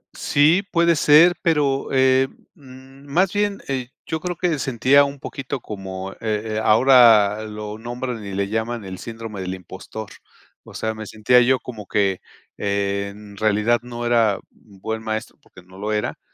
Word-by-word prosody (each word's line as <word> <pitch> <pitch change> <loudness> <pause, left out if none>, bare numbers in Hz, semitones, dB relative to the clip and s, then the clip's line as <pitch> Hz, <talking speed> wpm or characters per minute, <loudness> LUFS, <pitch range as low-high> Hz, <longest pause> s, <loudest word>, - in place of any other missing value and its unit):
Sí, 155 +6 +3
puede 170 0 +3
ser, 155 +4 +6
pero, 145 -5 +1
eh, 130 0 +4 0.3
mm, 135 0 -16
más 180 +5 +2
bien, 205 -1 -1
eh, 130 -3 -3 0.2
yo 160 - -3
creo 180 +2 -4
que 165 -3 -1
sentía 135 +3 +4
un 140 0 -7
poquito 135 0 -5
como, 95 -3 -7
eh, - - -21
eh, 110 0 -2
ahora 110 -3 +6
lo 105 0 -7
nombran 120 0 -5
y 100 -1 -7
le 100 0 -1
llaman 110 +1 -3
el 95 -1 -7
"síndrome 115 -3 -7
del 95 0 -4
impostor", 100 +3 -9 0.5
o - - -14
sea, 110 0 -2
me 110 -1 -8
sentía 115 +4 +3
yo 130 +2 +3
como 110 -6 -9
que 100 -3 0 0.4
en 100 0 -3
realidad 110 +3 +2
no 120 -1 -6
era 115 -4 +3
buen 110 +2 -7
maestro, 110 0 -5
porque - - -17
no 95 +1 -16
lo 105 +2 -3
era, 105 0 -2
115 Hz, 165 wpm, -21 LUFS, 105-135 Hz, 0.5 s, ser